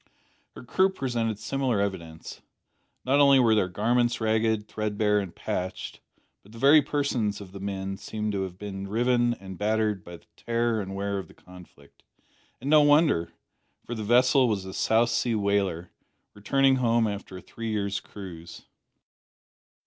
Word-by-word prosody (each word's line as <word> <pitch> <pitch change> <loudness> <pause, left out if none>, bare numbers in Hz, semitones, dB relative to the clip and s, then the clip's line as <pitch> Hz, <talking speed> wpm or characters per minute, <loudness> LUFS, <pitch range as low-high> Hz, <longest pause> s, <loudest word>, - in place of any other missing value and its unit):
Her - - -10
crew 190 +10 +2
presented 120 - -2
similar 125 0 -1
evidence. 85 -5 -5 0.6
Not 135 +3 +3
only 140 -1 +6
were 120 -4 +4
their 105 -4 +2
garments 120 +6 +1
ragged, 110 -1 0
threadbare, 105 -1 0
and 95 -4 -6
patched, 90 +1 -4 0.4
but 105 - -19
the - - -11
very 140 +5 +6
persons 130 -8 -1
of 100 -3 -11
the 100 - -9
men 95 0 -4
seemed 105 +1 -4
to 100 -1 -2
have 95 -1 -5
been 100 -1 -6
riven 120 +2 +1
and 95 -3 -10
battered 105 -2 0
by 85 0 -10
the - - -26
tear 115 -1 -1
and 95 0 -6
wear 100 0 -2
of 95 - -8
the - - -18
conflict. 90 -6 -17 0.6
And 130 - -7
no 150 +1 +6
wonder; 145 - +3 0.5
for 120 - -5
the 110 - -5
vessel 125 +4 +4
was 100 -4 -1
a 95 - -7
South 115 +4 +2
Sea 120 -1 0
whaler, 100 -4 -1 0.4
returning 135 +6 +2
home 115 -2 +2
after 100 -2 -6
a - - -10
three 115 -1 -6
years' 100 -2 -1
cruise. 85 -5 -10
110 Hz, 165 wpm, -26 LUFS, 95-120 Hz, 0.6 s, only